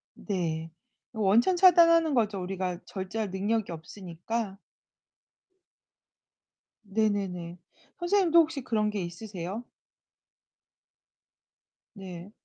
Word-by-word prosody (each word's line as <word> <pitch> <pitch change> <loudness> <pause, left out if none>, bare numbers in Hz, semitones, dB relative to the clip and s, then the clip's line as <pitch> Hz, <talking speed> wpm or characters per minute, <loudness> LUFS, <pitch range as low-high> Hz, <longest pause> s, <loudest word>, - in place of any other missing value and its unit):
네. 165 -5 -3 0.4
원천 220 - +3
차단하는 335 -3 +6
거죠. 210 -5 +1
우리가 180 -1 -3
절제할 195 +1 -4
능력이 205 +1 -1
없으니까. 190 +5 -5 2.2
네네네. 195 -5 -1 0.4
선생님도 345 -2 +4
혹시 310 -4 +1
그런 215 -3 0
게 205 -2 -3
있으세요? 185 +4 -6 2.3
네. 190 -1 -9
205 Hz, 190 characters per minute, -28 LUFS, 180-230 Hz, 2.3 s, 차단하는